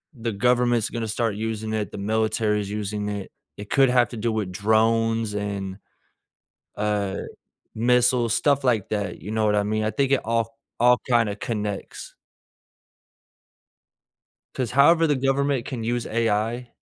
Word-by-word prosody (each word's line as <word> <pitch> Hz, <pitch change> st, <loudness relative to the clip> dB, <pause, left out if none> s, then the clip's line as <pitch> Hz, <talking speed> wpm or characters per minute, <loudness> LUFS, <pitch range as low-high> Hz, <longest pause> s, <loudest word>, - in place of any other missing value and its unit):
the 115 Hz, -1 st, -3 dB
government's 120 Hz, +1 st, +2 dB
gonna 115 Hz, -1 st, -4 dB
start 110 Hz, -1 st, -1 dB
using 110 Hz, 0 st, -3 dB
it, 105 Hz, -4 st, -2 dB
the -, -, -7 dB
military's 105 Hz, 0 st, 0 dB
using 105 Hz, 0 st, -3 dB
it. 100 Hz, -2 st, -5 dB, 0.3 s
It 105 Hz, 0 st, -9 dB
could 135 Hz, -2 st, +4 dB
have 125 Hz, -1 st, +3 dB
to 120 Hz, -, -8 dB
do 115 Hz, +1 st, -1 dB
with 105 Hz, -4 st, -2 dB
drones, 110 Hz, +2 st, +1 dB
and 100 Hz, -2 st, -4 dB, 1.0 s
uh, 105 Hz, -2 st, -1 dB, 0.6 s
missiles, 120 Hz, 0 st, +2 dB
stuff 140 Hz, 0 st, +2 dB
like 115 Hz, -6 st, +1 dB
that, 105 Hz, -1 st, -3 dB
you 105 Hz, -, -6 dB
know 110 Hz, 0 st, 0 dB
what 105 Hz, -, +2 dB
I 105 Hz, -, +3 dB
mean? 110 Hz, +1 st, -1 dB
I 110 Hz, -, +1 dB
think 135 Hz, +5 st, 0 dB
it 135 Hz, -, +3 dB
all 115 Hz, 0 st, -1 dB, 0.2 s
all 125 Hz, 0 st, +5 dB
kinda 115 Hz, -4 st, +2 dB
connects. 105 Hz, -3 st, -5 dB, 2.4 s
'Cause 125 Hz, -3 st, -2 dB
however 160 Hz, +5 st, +5 dB
the 145 Hz, -, +2 dB
government 135 Hz, -1 st, 0 dB
can 120 Hz, -4 st, -5 dB
use 120 Hz, 0 st, -1 dB
AI, 115 Hz, +2 st, -1 dB
110 Hz, 150 wpm, -24 LUFS, 105-120 Hz, 2.4 s, all